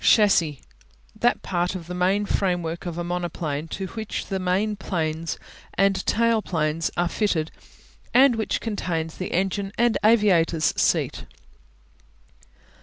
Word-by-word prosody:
Chassis - - +7
(shas 210 -2 +5
see) 150 -5 +1 0.6
That - - +2
part 175 +1 -1
of 175 -3 -6
the 180 - -6
main 190 +3 +1
framework 175 -3 -1
of 170 -1 -5
a 175 - -2
monoplane 170 -3 -3
to 190 +4 -4
which 220 -2 -4
the 195 -1 -3
main 190 +4 0
planes 165 -4 -2 0.4
and 195 -1 +2
tail 230 0 +3
planes 160 -3 -1
are 175 0 +2
fitted 170 -5 0 0.6
and 260 0 +6
which 220 -1 -1
contains 165 -7 -3
the 185 - -4
engine 195 +2 -1
and 235 -1 +2
aviators 185 -8 +4
seat. - - +1
180 Hz, 140 wpm, -24 LUFS, 165-205 Hz, 0.6 s, Chassis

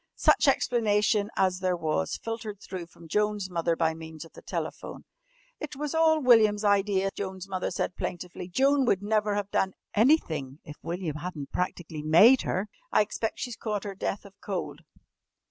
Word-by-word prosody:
Such - - +4
explanation 210 -3 +2
as 185 -1 +1
there 185 -1 0
was 155 - -1
filtered 225 -3 -6
through 185 -4 -7
from 170 0 -16
Joan's 210 +1 0
mother 170 -1 0
by 160 -1 +1
means 160 0 -9
of 165 - -17
the - - -12
telephone. - - -5 0.5
"It 305 -4 -6
was 295 +2 -4
all 320 -1 +4
William's 220 -6 +5
idea," 200 -1 +2
Joan's 190 -1 -5
mother 185 -1 -2
said 180 0 -3
plaintively. 180 0 -5
"Joan 270 +8 +3
would 200 -5 +1
never 210 0 +1
have 205 -1 -3
done 190 -1 +1 0.2
anything 165 - +2
if 150 - -10
William 170 -3 -4
hadn't 150 -3 -6
practically 170 -3 -3
made 185 +12 +6
her. 190 +3 -2 0.2
I - - +5
expect 215 +1 -3
she's 245 -3 -4
caught 210 -4 -3
her 200 -2 -5
death 195 +1 -4
of 200 - -13
cold. - - -4
195 Hz, 170 wpm, -28 LUFS, 175-215 Hz, 0.5 s, made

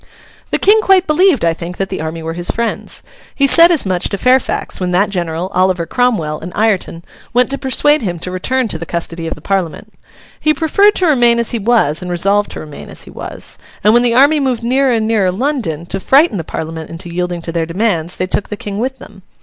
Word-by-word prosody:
The - - 0
King 430 +2 +4
quite 380 -3 +4
believed, 310 - +3
I 165 - +2
think, 170 +2 -7
that 195 0 -2
the 190 - -4
army 160 +1 -5
were 165 0 -4
his 175 +1 -3
friends. 235 0 -3 0.3
He 280 - +3
said 335 +5 +7
as 320 -9 +2
much 185 -2 0
to 200 - -3
Fairfax 255 +4 +1
when 180 -1 -2
that 200 +3 +2
general, 175 0 -3
Oliver 185 -2 +1
Cromwell, 170 -9 0
and 170 +3 -8
Ireton, 195 -6 -1 0.3
went 250 +2 +2
to 275 - -2
persuade 295 +3 +2
him 180 -6 -3
to 180 +2 -6
return 255 +7 -1
to 160 - -4
the 170 - -7
custody 165 -1 -4
of - - -4
the - - -15
Parliament. 190 -5 -3 0.5
He 305 0 +2
preferred 395 +8 +3
to 370 - +1
remain 240 -7 +3
as 235 -1 0
he 235 - -2
was, 210 -9 +1
and 180 - -6
resolved 195 +4 +1
to - - -7
remain 150 -2 -10
as - - -9
he - - -13
was. - - -7 0.2
And 210 +2 +5
when 240 - +5
the 240 -1 +1
army 285 +4 +5
moved 255 -4 -1
nearer 260 +2 +2
and 220 -2 0
nearer 210 -5 +2
London 200 - -2
to 195 +3 -4
frighten 275 - +3
the 165 - -3
Parliament 160 0 -6
into 170 +1 -8
yielding 175 -1 -3
to 165 - -4
their 165 -1 -2
demands, 175 -2 -1
they 185 - -1
took 195 +2 -3
the 210 - -5
King 205 0 -5
with 265 +3 -2
them. 195 -5 -14
200 Hz, 230 wpm, -15 LUFS, 170-255 Hz, 0.5 s, said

